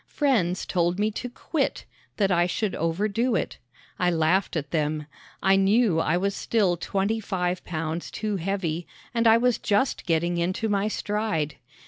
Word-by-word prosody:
Friends 220 - +1
told 175 0 +1
me 210 +1 +1
to 250 +4 -5
quit 280 +4 -2 0.3
that 200 -2 +2
I 175 0 +3
should 200 +3 -1
overdo 210 +9 0
it. - - -2 0.4
I 180 - +3
laughed 170 +3 +1
at 150 -3 -3
them. 150 -1 -1 0.4
I 195 0 +5
knew 195 -2 +3
I 165 +2 +2
was 200 +2 0
still 200 -4 +1
twenty 200 +5 -1
five 180 -3 -2
pounds 160 0 -3
too 210 -2 -2
heavy 175 -2 -2 0.3
and 230 -1 +2
I 225 0 +7
was 245 0 +2
just 210 +3 0
getting 170 +1 +1
into 185 +6 -1
my 200 0 +1
stride. 210 -9 -2
190 Hz, 160 wpm, -26 LUFS, 170-215 Hz, 0.4 s, I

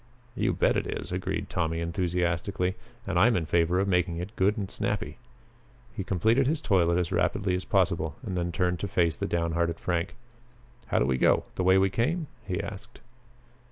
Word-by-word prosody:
"You - - +1
bet - - +2
it - - -1
is!" - - -5
agreed - - -2
Tommy 80 -1 -1
enthusiastically, 90 +2 -1 0.3
"and 95 -2 0
I'm 115 +4 +5
in 85 - 0
favor 85 +3 +2
of 100 - +1
making 90 -2 +1
it 95 +6 -6
good 100 +4 +2
and 100 -2 -2
snappy." 105 +1 -2 0.8
He 100 - -3
completed 110 +9 +2
his 155 +2 +1
toilet 90 - +2
as 90 -2 -1
rapidly 95 -1 +1
as 90 0 -2
possible 85 -5 +1
and 95 -4 -3
then 85 -1 -1
turned 90 0 0
to 100 - -2
face 85 -3 +1
the - - -3
down 85 -1 0
hearted 85 0 0
Frank. 85 -2 -2 0.7
"How - - 0
do - - +3
we 65 -1 0
go? - - +4
The 95 - -2
way 95 +1 +5
we 95 0 +3
came?" 155 - 0 0.2
he 90 -1 -1
asked. 100 -1 -8
90 Hz, 190 wpm, -28 LUFS, 85-100 Hz, 0.8 s, I'm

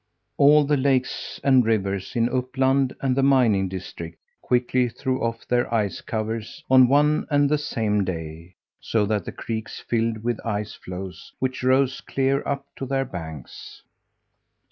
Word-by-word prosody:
All 150 +1 +6
the 145 0 +1
lakes 130 -1 0
and 130 -2 +5
rivers 100 -4 -1
in 115 0 +2
Uppland 130 +1 +1
and 130 -2 +1
the 135 - +2
mining 120 -8 +3
district 85 -3 -7 0.2
quickly 125 0 +1
threw 130 +2 -2
off 115 0 -3
their 120 -2 +1
ice 105 -5 0
covers 110 0 -4
on 130 -1 +8
one 150 +3 +3
and 145 -1 +3
the 150 +1 +1
same 105 -7 0
day, 85 -1 -6 0.2
so 110 -2 0
that 105 -2 -1
the - - -5
creeks 110 -1 -5
filled 115 -2 -1
with 120 -1 -2
ice 105 -2 -3
floes 90 0 -8
which 130 0 -2
rose 130 +1 +2
clear 135 +1 0
up 140 -1 -2
to 135 - -5
their 135 0 0
banks. 80 - -9
120 Hz, 155 wpm, -24 LUFS, 105-135 Hz, 0.2 s, on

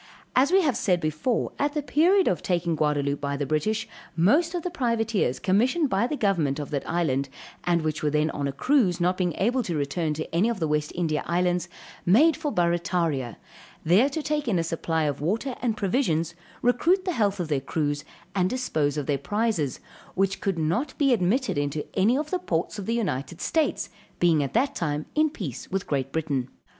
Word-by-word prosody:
_] - - -23 0.3
As 270 +5 +4
we 380 0 +5
have 280 -7 +2
said 200 -8 +1
before, 155 - -1
at 290 +1 +1
the 300 -1 -2
period 355 +7 +3
of 180 - +2
the - - -17
taking 175 -2 0
of 160 - -1
Gaudaloupe 145 -2 0
by 140 0 -2
the 145 - -1
British, 185 +10 0 0.3
most 295 - +3
of 345 - -2
the 360 - -3
privateers 225 - 0
commissioned 250 - +2
by 200 +5 +2
the 295 - -3
government 170 - +1
of 145 0 -5
that 140 -2 -3
island, 140 -6 0 0.4
and 170 -2 +2
which 155 -1 -2
were 150 - +1
then 150 +1 +1
on 145 -1 -2
a - - -2
cruise, 190 - +2
not 180 +1 +2
being 180 -2 0
able 245 +6 +1
to 175 -8 -3
return 150 +2 -1
to 155 - -4
any 200 +7 +3
of 230 -4 -2
the 160 - 0
West 150 0 0
India 160 -3 0
Islands, 175 0 0 0.3
made 290 - +5
for 300 -2 -3
Barrataria, 170 - 0 0.5
there 195 - +5
to 300 +2 -4
take 300 -2 -1
in 205 -6 +2
a 165 - +1
supply 165 -1 -1
of 145 -2 -1
water 225 - -1
and 230 -3 0
provisions, 175 - 0 0.3
recruit 330 +10 +3
the 365 - 0
health 205 - 0
of 175 - -2
their 145 -3 +1
crews, 145 +1 -2 0.3
and 185 -2 +1
dispose 155 - -1
of 145 - -2
their 140 -1 0
prizes, 205 - -1 0.4
which 195 0 0
could 195 -3 -1
not 170 - -1
be 275 -3 +4
admitted 220 - +1
into 145 +1 -2
any 215 +7 +3
of 300 +1 -3
the 370 - 0
ports 180 - -2
of 195 - -6
the 230 - +1
United 170 - -2
States, 320 -2 0
we - - -27
being 165 -3 +4
at 140 - -3
that 270 +4 +2
time 150 - -2
in 310 0 +3
peace 170 - -6
with 195 0 -2
Great 135 -2 -2
Britain. 140 -5 -1
180 Hz, 215 wpm, -26 LUFS, 155-245 Hz, 0.5 s, we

